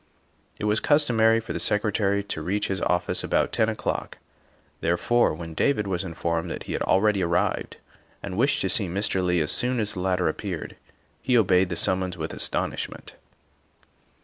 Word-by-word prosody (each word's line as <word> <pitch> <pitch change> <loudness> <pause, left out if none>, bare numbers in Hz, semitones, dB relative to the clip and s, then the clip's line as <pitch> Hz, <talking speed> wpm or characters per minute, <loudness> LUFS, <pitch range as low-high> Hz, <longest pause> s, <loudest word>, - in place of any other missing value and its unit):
It - - -4
was 105 +1 +2
customary 115 -7 +3
for 115 - -6
the - - -3
Secretary 100 -1 +1
to 100 -6 -5
reach 100 +6 -1
his 95 -2 -2
office 90 - 0
about - - +1
ten - - +2
o'clock, - - -3 0.6
therefore, 85 +8 +2
when 80 0 -8
David 105 - +1
was 95 -2 -2
informed 85 -2 -2
that - - -5
he - - -5
had - - -2
already 100 0 +2
arrived 85 0 -1 0.5
and 100 -2 -5
wished 135 +7 +2
to 95 - 0
see 100 - +1
Mr. 95 +1 -1
Leigh 90 -2 +2
as 75 - +1
soon 125 0 +2
as 105 -1 -1
the - - -6
latter 90 -1 +1
appeared, 85 +1 -4 0.5
he 125 0 +2
obeyed 95 -4 +3
the 85 - -2
summons 95 0 0
with 80 -1 -4
astonishment. - - -3
95 Hz, 175 wpm, -25 LUFS, 90-110 Hz, 0.6 s, customary